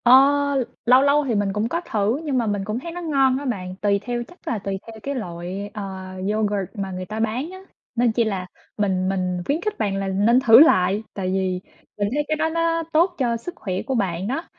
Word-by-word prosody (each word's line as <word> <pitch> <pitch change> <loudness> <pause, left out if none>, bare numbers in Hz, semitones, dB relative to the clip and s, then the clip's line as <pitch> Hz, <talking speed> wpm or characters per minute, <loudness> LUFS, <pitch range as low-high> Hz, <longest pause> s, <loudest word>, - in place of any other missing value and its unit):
Ơ, 240 - +5 0.4
l 265 - +2 0.2
lâu 250 +2 +7
lâu 285 +1 +3
thì 235 - +1
mình 200 -1 0
cũng 210 +3 -1
có 335 +6 -1
thử, 215 +4 0
nhưng 285 -4 -1
mà 240 - +1
mình 205 -1 -1
cũng 215 +3 -2
thấy 335 +6 -7
nó 355 +1 -6
ngon 270 -5 +2
á 285 - -5
bạn, 185 -7 -3
tùy 200 -1 +2
theo 240 +2 -3
chắc 355 - -19
là 225 - -1
tùy 195 0 -4
theo 225 -1 -10
cái 280 0 -3
loại, 185 -1 -5
ờ, 210 - -5 0.5
yoghurt 205 -3 0
mà 195 -3 -4
người 185 0 -5
ta 215 +4 -5
bán 230 +7 -1
á. 375 - -9 0.4
Nên 240 -1 +3
chỉ 235 +1 +2
là 195 -4 -2 0.3
mình 190 -3 +1
mình 185 -2 -1
khuyến 300 +4 0
khích 425 +2 -2
bạn 205 -3 0
là 195 0 -2
nên 205 +6 +3
thử 235 -3 +8
lại, 210 - +5
tại 190 -2 -3
vì 185 -1 0 0.4
mình 205 0 0
thấy 295 +1 +1
cái 310 - +1
đó 320 +1 +1
nó 330 0 0
tốt 345 +3 +3
cho 240 -3 +1
sức 350 +10 -8
khỏe 185 -3 -3
của 265 - -1
bạn 190 -4 -1
đó. 275 +8 -2
220 Hz, 245 wpm, -23 LUFS, 195-270 Hz, 0.5 s, thử